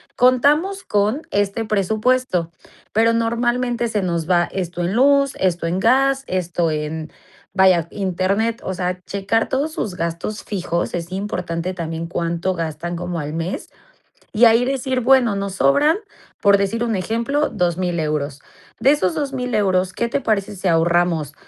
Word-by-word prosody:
"Contamos 295 +10 +3
con 210 +7 0
este 205 +2 0
presupuesto, 215 -2 0 0.4
pero 225 +2 +3
normalmente 240 +1 0
se 210 -2 -1
nos 170 -3 -2
va 175 -1 +4
esto 175 -2 -4
en 175 +2 -1
luz, 275 +2 +4
esto 175 -3 0
en 175 +3 -1
gas, 270 +5 +3
esto 175 -2 -1
en, 155 +1 -4 0.4
vaya, 185 -4 +4
Internet". 200 +4 -1
O 190 - -3
sea, 180 0 -3
checar 200 +3 -1
todos 285 +4 0
sus 215 - -3
gastos 170 +5 -4
fijos, 175 -4 -2
es 170 +1 -5
importante 185 -3 -3
también 165 -1 -4
cuánto 170 +1 -1
gastan 165 +1 -4
como 175 0 -4
al 150 0 -5
mes, 165 +3 -4 0.6
y 225 +2 +5
ahí 230 +2 +5
decir: 260 -1 -1
"Bueno, 250 -3 +4
nos 195 -1 -3
sobran". 290 - +4 0.5
Por 200 0 +5
decir 220 +4 -1
un 230 -2 -1
ejemplo: 230 - 0
"€2000 175 -2 -1
euros. 150 -2 -2 0.4
De 275 - +5
esos 185 -12 +1
€2000 265 -4 -3
euros, 185 -3 +1
¿qué 235 - -1
te 275 - -1
parece 210 -4 -1
si 190 0 -2
ahorramos, 165 -2 +2
195 Hz, 155 wpm, -20 LUFS, 175-235 Hz, 0.6 s, y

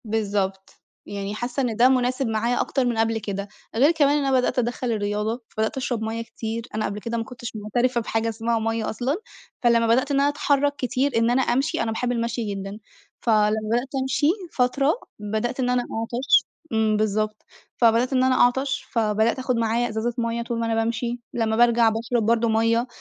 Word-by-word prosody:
بالضبط. 200 -3 -2 0.3
يعني 200 0 -5
حاسّة 245 +4 -2
إن 240 -4 -1
ده 245 +3 +5
مناسب 255 0 +1
معايا 225 +2 0
أكتر 265 -2 0
من 240 -2 0
قبل 225 0 +1
كده، 200 -1 -4 0.3
غير 275 +7 +5
كمان 295 -3 +3
إن 285 - 0
أنا 265 -1 +3
بدأت 250 - 0
أدخل 245 0 -1
الرياضة 210 +2 -1
فبدأت 220 +3 -2
أشرب 245 -3 -2
مَيّة 225 +1 -3
كتير، 230 +1 -5
أنا 215 - 0
قبل 205 +1 -3
كده 235 +2 -3
ما 225 - -1
كنتش 235 0 -8
معترفة 240 +4 0
بحاجة 225 0 -1
اسمها 225 +1 -1
مَيّة 225 0 -1
أصلًا، 250 +6 -1 0.5
فلما 235 -1 +4
بدأت 255 +5 +2
إن 275 - +2
أنا 280 +1 +4
أتحرك 285 0 +1
كتير 265 +1 0
إن 230 +1 +3
أنا 255 +2 +3
أمشي 275 +7 0
أنا 225 - -2
باحب 245 +2 -1
المشي 235 0 -1
جدًا، 195 +1 -6 0.4
فلما 215 -2 +3 0.2
بدأت 245 +3 +1
أمشي 265 +2 +1 0.3
فترة، 275 +4 +2 0.3
بدأت 220 +5 -2
إن 250 -1 +1
أنا 250 0 +2
أعطش 235 +3 +1 0.3
امم، 220 -1 +2
بالضبط. 215 0 -1 0.3
فبدأت 235 +2 +3
إن 255 -1 +3
أنا 260 0 +3
أعطش، 265 +3 +2
فبدأت 220 +1 +1
أخد 255 -1 0
معايا 230 +1 +1
ازازة 220 +2 -2
مَيّة 230 0 -1
طول 235 0 -3
ما 230 - 0
أنا 225 0 0
بامشي 235 +2 -1
لمّا 225 -2 0
بارجع 235 0 +5
باشرب 225 +1 -1
برضو 230 +1 +2
مَيّة، 230 +2 +2
230 Hz, 190 wpm, -24 LUFS, 220-250 Hz, 0.5 s, ده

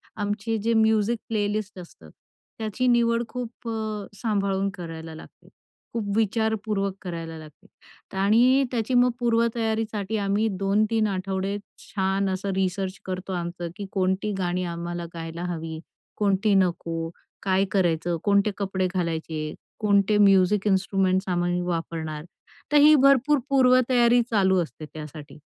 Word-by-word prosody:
आमचे 210 +2 -2
जे 225 +2 0
music 220 0 +3
playlist 210 -2 -2
असतं, 125 - -13 0.5
त्याची 220 +3 -1
निवड 235 -1 +3
खूप 245 -1 -7
अ, 215 -2 -3
सांभाळून 200 -3 0
करायला 165 -3 -8
लागते, 160 - -14 0.5
खूप 230 -3 -2
विचारपूर्वक 215 -2 0
करायला 165 -3 -6
लागते. 155 +5 -14 0.5
आणि 235 +7 +4
त्याची 235 0 -1
मग 245 0 +5
पूर्वतयारीसाठी 225 -3 0
आम्ही 205 +2 +1
2-3 215 +3 +2
आठवडे 195 0 -2 0.2
छान 195 0 -1
असं 190 +1 -2
रिसर्च 190 0 -1
करतो 185 0 -4
आमचं, 175 -1 -4
की 205 - -6
कोणती 190 +2 0
गाणी 180 -1 -1
आम्हाला 170 0 -4
गायला 165 0 -6
हवी, 160 -1 -6 0.4
कोणती 200 0 +2
नको, 170 -3 0 0.3
काय 190 0 +2
करायचं, 175 -3 +1
कोणते 200 0 +3
कपडे 190 -2 -1
घालायचे, 160 -3 -2 0.3
कोणते 205 -1 +3
म्युझिक 200 0 +4
इन्स्ट्रुमेंट्स 190 -1 +1
आम्ही 175 0 0
वापरणार. 165 -3 -4 0.5
तर 295 - +5
ही 295 +1 +8
भरपूर 275 +1 +4
पूर्वतयारी 250 -2 +4
चालू 190 -3 +3
असते 155 -1 -10
त्यासाठी. 150 -1 -9
195 Hz, 125 wpm, -25 LUFS, 180-220 Hz, 0.5 s, ही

